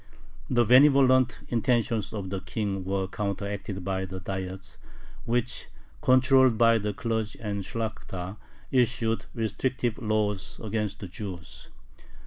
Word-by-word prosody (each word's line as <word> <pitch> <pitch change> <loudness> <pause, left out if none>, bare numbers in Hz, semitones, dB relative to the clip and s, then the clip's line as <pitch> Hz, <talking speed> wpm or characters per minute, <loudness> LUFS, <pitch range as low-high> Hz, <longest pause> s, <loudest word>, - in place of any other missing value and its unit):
The 120 -2 +3
benevolent 130 -1 +5
intentions 115 -3 +1
of 100 -4 -5
the 95 - -2
King 100 -2 -3
were 95 0 -1
counteracted 100 -1 -4
by 95 0 -1
the 95 0 -6
Diets, 95 0 -6 0.5
which, 120 +1 -1 0.3
controlled 130 -2 +5
by 115 0 +5
the 105 0 -1
clergy 110 0 -3
and 100 -3 -3
Shlakhta, 100 -3 -5 0.3
issued 120 -3 +1
restrictive 120 +1 -1
laws 105 -4 -1
against 105 -2 -2
the 100 - -5
Jews. 90 -3 -8
110 Hz, 115 wpm, -27 LUFS, 95-120 Hz, 0.5 s, benevolent